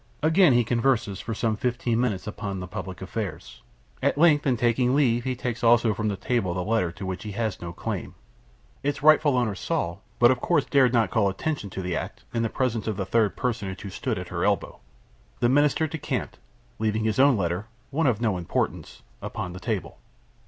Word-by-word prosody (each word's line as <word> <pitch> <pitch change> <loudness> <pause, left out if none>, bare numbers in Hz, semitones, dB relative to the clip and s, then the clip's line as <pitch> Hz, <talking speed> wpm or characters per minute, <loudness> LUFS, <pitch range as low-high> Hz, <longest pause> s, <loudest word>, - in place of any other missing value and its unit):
Again 160 -1 +5
he 120 0 +4
converses, 115 -4 +1
for 115 - -4
some 110 0 0
fifteen 120 0 0
minutes, 110 -7 -1
upon 100 -2 -4
the 90 - -5
public 95 +1 -7
affairs. 100 +1 -6 0.4
At - - +1
length, 150 -2 +4
in 125 -3 +2
taking 120 +2 +2
leave, 120 -4 +2
he 130 -1 -1
takes 120 -1 -4
also 115 -1 +5
from 110 +1 -2
the 100 - 0
table 95 -8 -1
the 90 - -1
letter 105 -4 +1
to 95 - -7
which 95 -1 -4
he 105 -1 -6
had 110 -1 -1
no 85 -1 -5
claim. - - -5 0.7
Its 140 0 -2
rightful 155 -3 +5
owner 120 -4 +1
saw, 95 - -2 0.2
but 120 0 +6
of 125 - -1
course, 145 - +2
dared 135 -4 +4
not 115 -6 +2
call 105 -3 +3
attention 105 +2 -3
to 95 0 -5
the 90 -1 -2
act, - - -5
in 115 - 0
the 115 - 0
presence 115 -4 -1
of 105 -3 -2
the 95 - -2
third 110 +2 +2
personage 105 -6 -3
who 100 - -7
stood - - -2
at - - -6
her - - -2
elbow. - - 0 0.6
The 120 - +3
Minister 145 +3 +3
decamped, 155 -1 -4 0.4
leaving 110 0 0
his 110 +1 0
own 135 -3 +6
letter 90 +2 -2 0.2
one 150 +1 +1
of 115 -5 +2
no 110 -5 +1
importance 85 - -3 0.2
upon 90 - -5
the 90 - -8
table." 90 - -3
115 Hz, 205 wpm, -26 LUFS, 100-130 Hz, 0.7 s, but